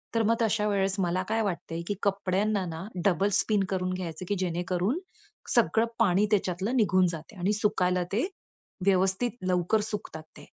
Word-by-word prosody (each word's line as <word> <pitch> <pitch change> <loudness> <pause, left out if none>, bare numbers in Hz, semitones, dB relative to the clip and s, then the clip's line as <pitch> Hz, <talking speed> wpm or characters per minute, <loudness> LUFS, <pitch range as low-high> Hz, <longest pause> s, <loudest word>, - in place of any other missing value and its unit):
तर 225 - +3
मग 230 +2 +3
तशा 215 -1 +2
वेळेस 195 -1 +1
मला 180 0 +1
काय 225 +1 +1
वाटतं 175 -5 -3
आहे 170 - -2
की 205 - 0
कपड्यांना 200 0 +1
ना 165 +1 -6 0.2
डबल 195 +1 +3
स्पिन 210 -3 +2
करून 185 -1 -1
घ्यायचं 180 -1 -5
की 205 - 0
जेणेकरून 180 - -1 0.6
सगळं 225 +1 +4
पाणी 200 -2 +4
त्याच्यातलं 195 +3 0
निघून 185 -5 +4
जाते 165 +5 -8
आणि 190 +4 +1
सुकायला 185 -3 +1
ते 225 +7 +1 0.6
व्यवस्थित 195 +4 +2 0.2
लवकर 180 +3 +2
सुकतात 205 -7 -5
ते - - -12
195 Hz, 165 wpm, -28 LUFS, 180-210 Hz, 0.6 s, सगळं